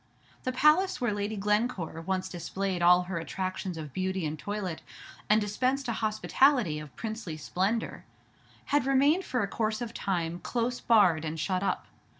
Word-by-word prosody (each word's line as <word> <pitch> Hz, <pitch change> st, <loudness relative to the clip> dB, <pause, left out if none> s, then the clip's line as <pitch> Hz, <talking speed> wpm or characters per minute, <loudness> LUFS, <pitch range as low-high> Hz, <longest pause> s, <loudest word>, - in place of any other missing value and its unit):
The 255 Hz, -, +1 dB
palace 305 Hz, +9 st, +4 dB
where 240 Hz, -4 st, 0 dB
Lady 205 Hz, +1 st, -2 dB
Glencore 210 Hz, -5 st, 0 dB
once 185 Hz, +2 st, -2 dB
displayed 185 Hz, +1 st, -3 dB
all 180 Hz, +1 st, +6 dB
her 180 Hz, -1 st, -3 dB
attractions 185 Hz, +1 st, -4 dB
of 150 Hz, -4 st, -7 dB
beauty 185 Hz, -1 st, -1 dB
and 150 Hz, 0 st, -2 dB
toilette, 200 Hz, -3 st, -4 dB, 0.5 s
and 210 Hz, +1 st, +6 dB
dispensed 255 Hz, +6 st, 0 dB
a -, -, 0 dB
hospitality 215 Hz, -, +2 dB
of 150 Hz, -4 st, -10 dB
princely 220 Hz, -, -5 dB
splendor, 195 Hz, +8 st, -2 dB, 0.7 s
had 290 Hz, -2 st, +3 dB
remained 285 Hz, +7 st, +3 dB
for 250 Hz, -5 st, 0 dB
a -, -, -1 dB
course 215 Hz, +1 st, -1 dB
of 235 Hz, -2 st, -5 dB
time 175 Hz, -3 st, -2 dB
close 240 Hz, +5 st, -2 dB
barred 185 Hz, -9 st, +4 dB
and 160 Hz, 0 st, -4 dB
shut 185 Hz, +3 st, 0 dB
up. 200 Hz, -, -1 dB
200 Hz, 160 wpm, -29 LUFS, 175-235 Hz, 0.7 s, all